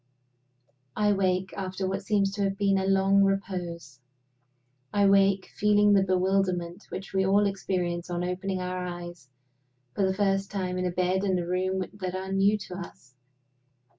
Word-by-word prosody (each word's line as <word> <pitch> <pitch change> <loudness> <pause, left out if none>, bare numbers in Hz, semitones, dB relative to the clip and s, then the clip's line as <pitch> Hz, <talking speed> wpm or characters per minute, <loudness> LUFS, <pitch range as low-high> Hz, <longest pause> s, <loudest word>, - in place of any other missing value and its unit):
I 210 -1 +3
wake, 185 -1 0
after 190 -1 -3
what 195 +1 -2
seems 195 -1 +1
to 200 +1 -4
have 195 0 0
been 195 -1 +2
a 190 - -1
long 195 +1 +4
repose 175 -8 -3 0.9
I 205 -1 +3
wake, 195 -1 +3
feeling 210 0 +4
the 195 - +5
bewilderment 185 -1 0
which 190 - -7
we 190 0 +2
all 200 +2 +3
experience 180 -3 -2
on 175 0 -2
opening 185 +1 -2
our 180 0 -3
eyes 175 -5 -7 0.6
for 200 - 0
the 190 0 +1
first 195 -1 +1
time 185 -2 -3
in 180 - 0
a - - -2
bed 185 +2 0
and 190 -2 +1
a 175 - -2
room 185 +1 -1
that 185 -3 -5
are 190 0 -4
new 195 +2 +3
to 185 -3 -8
us. 130 -7 -11
190 Hz, 165 wpm, -27 LUFS, 180-195 Hz, 0.9 s, the